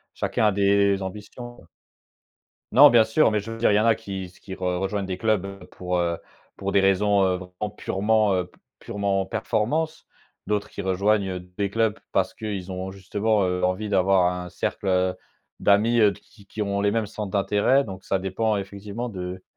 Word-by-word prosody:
chacun - - 0
a - - +3
des 100 0 +3
ambitions 105 +5 -8
quoi. 85 - -18 1.0
Non, 140 +5 +9
bien 115 -2 +6
sûr, 110 +7 +3
mais 105 - +1
je 115 +3 -7
veux 115 - -6
dire 115 -2 +3
il - - +3
y - - +4
en 110 - +2
a 115 -1 +5
qui 95 -4 -6
se 90 - -21
qui 95 - -9
re - - -10 0.2
rejoignent 95 +1 -2
des 95 -1 -3
clubs 100 -2 -1
pour, 90 0 -3
heu, 85 -1 0 0.4
pour 100 0 -3
des 100 - +4
raisons, 100 +1 +3
heu, 90 -1 +1
vraiment, 90 +3 -6
purement 105 +1 +1
heu, 90 -1 0
p - - -26 0.2
purement 100 -1 -1
performance, 155 +12 -1 0.4
d'autres 105 0 -1
qui - - -6
rejoignent 95 0 +1 0.2
des 100 -1 0
clubs 110 0 +1
parce 95 -1 +1
qu'ils 100 -4 -5
ont 95 +1 -5
justement, 100 +2 0
heu, 90 0 -1
envie 95 +4 0
d'avoir 95 -2 +3
un 90 0 -5
cercle 95 0 -1 0.4
d'amis, 110 +4 +3
heu, 105 -2 +5
qui 100 -1 -19
qui 105 - -6
ont 100 -1 -1
les 100 0 +2
mêmes 110 -1 -1
centres 105 -1 -6
d'intérêt, 105 +7 +2
donc 95 -5 -9
ça 95 - 0
dépend 105 +4 -1
effectivement 100 +4 -6
de 90 -2 -6
100 Hz, 195 wpm, -24 LUFS, 95-105 Hz, 1.0 s, Non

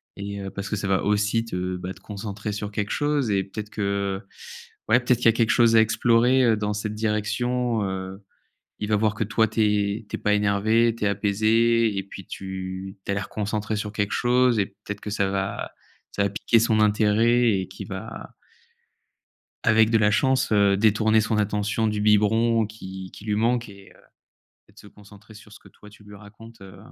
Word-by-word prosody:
et 100 0 -6
heu, 95 - -5
parce 100 +1 -6
que - - -1
ça 95 0 -3
va 95 -1 +1
aussi 105 +2 +1
te, 90 -4 -3
bah, 90 +1 -6
te - - -18
concentrer 105 0 -6
sur 105 0 -5
quelque 105 0 -3
chose, 145 -4 0
et 100 -2 +1
peut-être 105 +2 -8
que, 100 -1 -2 0.7
ouais, 120 +3 +5
peut-être 120 0 +2
qu'il - - -4
y - - +9
a 115 - +3
quelque 115 -1 +1
chose 115 -2 +4
à 110 - +7
explorer, 120 +3 +3
heu, 115 - +4
dans 105 0 -2
cette 105 +1 -4
direction. 110 +2 -1
Heu, 95 +1 -5 0.6
il 105 - -4
va 105 - +3
voir 105 0 +1
que 110 - -1
toi 110 +1 +1
tu 110 +1 -5
es 105 +1 0
tu - - -3
es - - -15
pas 105 - +1
énervé, 110 +3 +2
tu 105 - -2
es - - +3
apaisé 110 +2 +2
et 95 - -2
puis 95 -1 -11
tu 95 0 -7
tu - - -2
as - - 0
l'air 100 0 -3
concentré 105 +1 -3
sur 105 0 -4
quelque 105 0 -2
chose, 125 -2 +2
et 100 - +1
peut-être 100 +1 -9
que 105 - -6
ça 100 -1 0
va 95 0 -3 0.4
ça 100 - +1
va - - 0
piquer 110 +4 +2
son 110 -1 +2
intérêt 110 +3 +3
et 95 - -4
qu'il - - -9
va - - -8 1.3
avec 110 0 +4
de 115 - +4
la 105 -1 +3
chance, 130 +3 +1
heu, 100 -2 +4
détourner 110 +1 +3
son 110 0 -1
attention 105 +2 0
du 105 -1 -2
biberon 110 +2 +3
qui 95 -3 -9
qui - - -13
lui 105 -1 -1
manque 115 +1 0
et 100 -1 -15
heu, - - -22 0.7
et - - -22
de - - -38
se - - -15
concentrer 105 +1 -16
sur 105 0 -15
ce 110 - -12
que - - -18
toi 105 - -17
tu 105 0 -18
lui 105 0 -14
racontes, 110 +2 -15
heu, 95 0 -12
105 Hz, 215 wpm, -24 LUFS, 100-115 Hz, 1.3 s, y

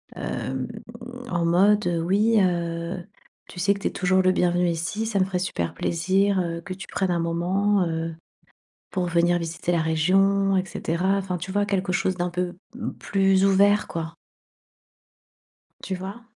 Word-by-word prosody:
hem, 130 -1 -3 0.6
en 170 -1 0
mode, 195 +4 +4
heu: 170 -1 0
«Oui, 205 +6 +2
heu, 170 -1 -1 0.5
tu 180 - -10
sais 200 +3 +3
que 200 - -8
tu - - -1
es - - -2
toujours 185 0 +2
le 185 0 +4
bienvenu 180 -1 +2
ici. 170 +6 -2
Ça 215 -3 0
me - - +3
ferait 190 -1 -2
super 130 - -2
plaisir, 190 +4 +1
heu, 170 -1 -3
que 185 - -6
tu 190 +1 -9
prennes 190 -2 -1
un 170 - +1
moment, 180 +4 +1
heu, 165 0 -3 0.8
pour 185 -2 -1
venir 175 +1 +2
visiter 165 +1 -3
la 170 -2 +2
région 195 +5 +2
et 185 - +1
cetera». 185 +2 -1
Enfin, 190 -2 -3
tu 180 +3 -6
vois? 205 +1 +1
Quelque 195 -2 -1
chose 185 +1 +1
d'un 175 0 -1
peu 180 0 -2 0.5
plus 195 -1 +2
ouvert, 200 +2 +4
quoi. 165 0 -5 1.7
Tu 190 - -3
vois? 195 +5 -7
180 Hz, 170 wpm, -24 LUFS, 170-195 Hz, 1.7 s, mode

